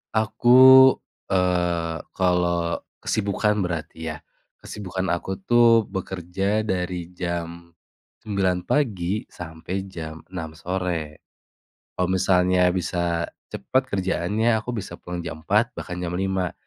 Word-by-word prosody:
Aku, 130 +4 +7 0.3
eee, 90 -3 0 0.2
kalau 85 -2 +1 0.2
kesibukan 105 0 0
berarti 80 -2 -4
ya. 75 -1 -4 0.5
Kesibukan 95 -2 -5
aku 90 +2 -2
tuh 115 +2 +5
bekerja 95 +2 -2
dari 90 -3 -2
jam 85 -1 -5 0.5
9.00 95 -4 0
pagi 105 -8 0
sampai 80 +1 -7 0.2
jam 80 -2 -7
6.00 80 -3 -6
sore. 85 -4 -3 0.8
Kalau 90 -1 0
misalnya 90 -1 +3
bisa 85 -2 -1 0.3
cepat 130 0 -1
kerjaannya 100 +4 +1
aku 125 - -5
bisa 85 -2 -8
pulang 90 0 -5
jam 80 - -6
4.00, 110 +6 +2
bahkan 90 - -6
jam 90 -1 -3
5.00. 95 -2 -1
90 Hz, 110 wpm, -24 LUFS, 85-105 Hz, 0.8 s, Aku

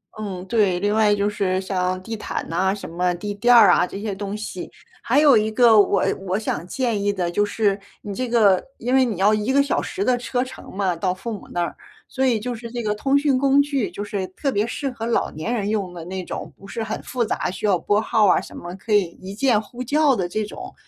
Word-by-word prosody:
嗯， 195 -4 -6
对。 195 -4 +2
另 205 +2 0
外 215 -1 +4
就 200 0 0
是 195 -3 -1
像 185 -1 -2
地 225 +3 -5
毯 215 - -5
呐 190 +3 +1
什 205 - -8
么 180 +2 0
地 205 +3 -5
垫 240 +5 +3
儿 235 - +8
啊 175 - +4
这 195 - -7
些 210 -1 -3
东 200 +1 -5
西。 210 -4 -6 0.3
还 265 +5 +2
有 285 -5 +7
一 215 0 +2
个 230 -1 +5
我 200 - +3 0.2
我 185 +2 0
想 175 -6 -3
建 235 -1 -1
议 205 - +2
的 180 -3 -2
就 205 - +2
是 205 -1 +1 0.3
你 205 - -5
这 255 +4 -3
个 210 -6 +4
因 245 +2 -2
为 265 0 +5
你 230 -7 -1
要 200 +3 +4
1 215 +4 0
个 280 +1 +4
小 280 - 0
时 395 - -3
的 255 - +3
车 245 0 -1
程 260 - -10
嘛 190 -3 0
到 180 +2 -1
父 225 +5 -6
母 205 - -8
那 175 - -1
儿， 170 - -4 0.3
所 265 0 -1
以 240 -4 +2
就 245 +3 -4
是 230 0 -9
这 240 -1 -3
个 210 -1 0
通 275 +6 +2
讯 280 -2 +2
工 275 +1 +4
具， 280 -5 -1
就 - - -7
是 200 -2 -3
特 230 +10 -3
别 210 -3 +1
适 275 +4 -3
合 225 -2 -6
老 235 - 0
年 160 +10 -4
人 210 -4 -1
用 200 -4 -2
的 170 -2 -8
那 185 +1 -5
种， - - -7
不 - - -15
是 225 - -5
很 220 0 -4
复 245 -2 -1
杂， 205 - -2
需 190 - -5
要 200 -3 +3
拨 205 +4 +1
号 220 -1 +2
儿 - - +5
啊 - - 0
什 - - -11
么 175 +1 -7
可 210 +3 -4
以 205 -1 +5 0.2
一 190 +1 -8
键 230 -3 +2
呼 245 +4 -8
叫 290 +1 +3
的 180 -5 -2
这 215 +3 -2
种， - - -9
210 Hz, 275 characters per minute, -22 LUFS, 190-240 Hz, 0.3 s, 儿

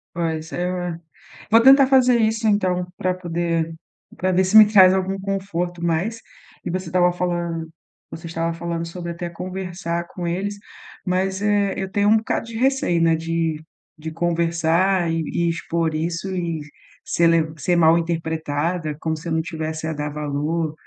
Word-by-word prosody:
Pois 160 -1 -3
é. 180 -1 -3 0.5
Vou 225 +1 +7
tentar 270 +2 +7
fazer 255 -2 +4
isso, 220 0 +1
então, 185 -4 +1
para 185 0 0
poder 170 -2 -2 0.4
para 185 +1 0
ver 185 +1 +3
se 190 +4 +5
me 215 - +11
traz 190 -3 +7
algum 190 +1 -1
conforto. 190 -3 -3
Mas, 175 +7 -1 0.5
você 185 +1 -3
estava 180 +1 +3
falando 175 -2 -3 0.4
você 165 - -8
estava 165 0 -2
falando 170 0 -4
sobre 170 0 -6
até 175 +1 -5
conversar 175 -1 -5
com 175 0 -7
eles, 195 +4 -2 0.5
mas, 190 +1 -1
eh, 205 -1 +1
eu 190 0 -4
tenho 205 +1 +2
um 220 - +6
bocado 220 - -2
de 230 - -9
receio, 260 -9 +1
né, 165 -1 +4
de 165 -1 -2 0.4
de 160 +1 -6
conversar 170 +2 +1
e 165 0 0
e 170 - 0
expor 165 -1 -1
isso 170 +4 -3
e 170 -3 -2 0.5
ser 170 - +2
le 165 -2 +2
ser 175 +5 +1
mal 165 -1 +5
interpretada, 160 -1 -2
como 160 0 -2
se 155 +2 -9
eu - - -3
não 160 0 0
tivesse 160 -1 -4
a 160 - -2
dar 150 0 -3
valor, 150 +2 -2
170 Hz, 165 wpm, -22 LUFS, 165-190 Hz, 0.5 s, me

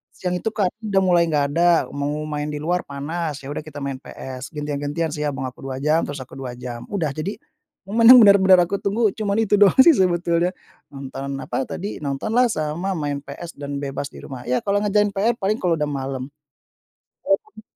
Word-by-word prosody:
Siang 180 -1 -2
itu - - -5
kartun 215 +2 -1
udah 195 - +4
mulai 175 -2 +4
nggak 145 -3 +1
ada, 175 +1 +4 0.2
mau 145 +2 -3
main 150 0 -3
di 150 -1 -4
luar 180 +2 0
panas, 145 +1 -4
ya 140 - -6
udah - - -3
kita 145 -2 -8
main 135 -1 -4
PS, 130 +2 -9
gantian-gantian 145 +2 -2
sih 150 -1 -2
abang 135 -2 -3
aku - - -20
2 130 -1 -4
jam, 155 +2 +2
terus 145 -2 -5
aku 130 - -13
2 125 -2 -6
jam, 120 -1 -7
udah. 165 -8 -2
Jadi, 155 +8 -4 0.5
memang 230 +4 +8
benar-benar 190 -3 +7
aku 195 +3 -2
tunggu 210 +1 +1
cuman 205 -1 -2
itu 205 -1 +2
doang 200 -3 +6
sih 335 - +8
sebetulnya. 175 -1 +1 0.4
Nonton, 135 0 -6
apa 135 - -3
tadi, 200 +3 -5
nontonlah 215 - +1
sama 165 +5 -2
main 145 -2 -2
PS 145 +4 -9
dan 140 0 -4
bebas 140 0 -3
di - - -11
rumah, 130 -2 -8
ya 125 0 0
kalau 200 0 +1
ngerjain 205 0 +2
PR 210 +4 +1
paling 210 +2 0
kalau 175 -3 +1
udah 150 0 0
malam. 135 -1 -4 0.9
Emang 210 +2 -1
155 Hz, 195 wpm, -22 LUFS, 140-195 Hz, 0.9 s, memang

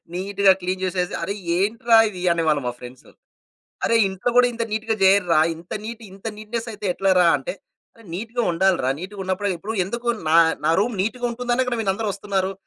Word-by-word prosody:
నీట్‌గా 195 +1 +3
క్లీన్ 185 +1 -3
చేసేసి, 180 -1 -2
"అరె 200 - -2 0.2
ఏంట్రా 225 +3 +3
ఇది" 185 -4 -8
అనేవాళ్ళు 155 -4 +1
మా 120 - -1
ఫ్రెండ్స్. 125 +1 -11 0.8
"అరె 230 - +2
ఇంట్లో 190 +5 -2
కూడా 250 0 +6
ఇంత 230 - -2
నీట్‌గా 220 +1 -1
చేయర్రా, 190 -4 +4 0.2
ఇంత 170 +2 -15
నీట్ 230 0 -7
ఇంత 195 +2 -16
నీట్‌నెస్ 225 +2 -5
అయితే 210 0 -8
ఎట్లరా" 185 -2 +3
అంటే - - -5 0.6
నీట్‌గా 230 +6 -3
ఉండాలిరా 170 -6 +2
నీట్‌గా 195 +3 -8
ఉన్నప్పుడే 190 +2 -1
ఇప్పుడు 210 +6 -5
ఎందుకు 235 +4 -5 0.2
నా 165 - +5 0.3
నా 160 - +4
రూమ్ 230 +1 -1
నీట్‌గా 245 +5 -2
ఉంటుందనే 245 +1 -1
కదా 235 -2 -2
మీరందరూ 205 +1 -1
వస్తున్నారు. 195 -1 -2
200 Hz, 170 wpm, -22 LUFS, 185-225 Hz, 0.8 s, కూడా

